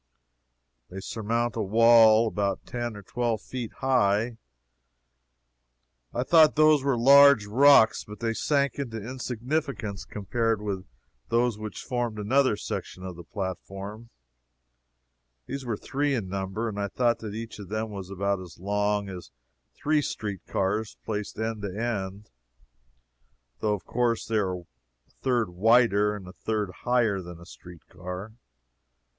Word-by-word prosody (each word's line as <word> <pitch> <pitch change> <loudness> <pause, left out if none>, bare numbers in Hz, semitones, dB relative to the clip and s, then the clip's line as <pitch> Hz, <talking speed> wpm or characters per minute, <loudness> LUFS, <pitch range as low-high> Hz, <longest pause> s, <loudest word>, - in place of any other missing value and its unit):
They 95 - -7
surmount 115 +3 -2
a 115 - -1
wall 115 +1 +6
about 100 -2 -2
ten 120 -2 -4
or 100 - -10
twelve 115 +1 -1
feet 125 -4 -5
high. 115 -3 +1 1.7
I 120 - -1
thought 160 +1 +6
those 155 -2 +5
were 135 -3 +1
large 140 -1 +7
rocks, 125 +1 +5
but 105 0 -11
they 115 -1 -1
sank 140 +2 0
into 120 -5 -4
insignificance 125 -2 -3
compared 115 +2 -1
with 100 -3 -4 0.4
those 120 -2 +1
which 110 -2 -6
formed 120 -3 -2
another 125 +2 +2
section 90 - -6
of 95 -2 -6
the 85 - -10
platform. 100 +4 -6 1.4
These 135 0 -6
were 110 -3 -1
three 140 +4 -1
in 100 -7 -3
number, 95 +4 -3
and 105 -2 -4
I 100 - -1
thought 120 +3 +1
that 105 -2 -6
each 115 -1 -7
of 100 -3 -9
them 110 +1 -3
was 95 -2 -7
about 100 0 -1
as 90 -3 -11
long 105 +2 0
as 90 -2 -8 0.5
three 150 0 +1
street 105 -8 -4
cars 105 +3 -1
placed 105 -2 -4
end 110 -1 -3
to 100 -1 -5
end, 105 -3 -3 1.3
though 105 -1 +1
of 95 - -11
course 120 -1 0
they 115 - 0
are 95 -3 -1
a - - -22 0.6
third 120 -7 +1
wider 105 +1 +4
and 95 -3 -9
a 90 - -10
third 105 -3 -2
higher 120 -6 +2
than 85 -1 -10
a 85 - -13
street 90 -1 -14
car. 90 +4 -7
110 Hz, 145 wpm, -27 LUFS, 100-120 Hz, 1.7 s, large